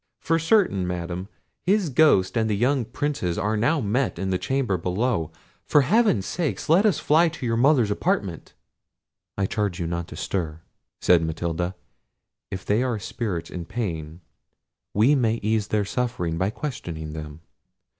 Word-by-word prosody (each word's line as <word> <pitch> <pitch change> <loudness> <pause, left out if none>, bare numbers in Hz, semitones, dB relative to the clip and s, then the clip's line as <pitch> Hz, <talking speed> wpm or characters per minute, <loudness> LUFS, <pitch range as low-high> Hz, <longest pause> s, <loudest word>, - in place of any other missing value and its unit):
For 165 0 +1
certain, 160 - +2
Madam, 90 +1 -4 0.3
his 195 -2 +2
ghost 125 -9 +4
and 110 -1 +1
the 105 - +1
young 125 +2 +2
Prince's 120 - -2
are 105 +2 0
now 130 +10 +2
met 120 +1 0
in 95 +2 -2
the 90 - 0
chamber 130 -7 0
below—for 90 - -1
Heaven's 195 - +3
sake 165 -5 -2
let 185 +7 +5
us 195 - +2
fly 165 +3 +4
to 155 -5 -7
your 115 -1 +1
mother's 125 -3 +4
apartment!" - - -2 0.8
"I 100 - +1
charge 100 -2 -2
you 85 - -2
not 85 0 -3
to - - -9
stir," 80 -4 -3 0.4
said 90 -2 +5
Matilda. 85 +2 -2 0.7
"If 95 -1 -6
they 105 +3 +2
are 125 -3 0
spirits 95 -5 -4
in 85 -2 -5
pain, 85 -6 -4 0.7
we 115 +8 +5
may 115 -5 +2
ease 110 -1 +1
their 105 -1 0
sufferings 100 -9 -2
by 95 - +1
questioning 85 - -5
them. 75 0 -8
105 Hz, 155 wpm, -24 LUFS, 90-135 Hz, 0.8 s, let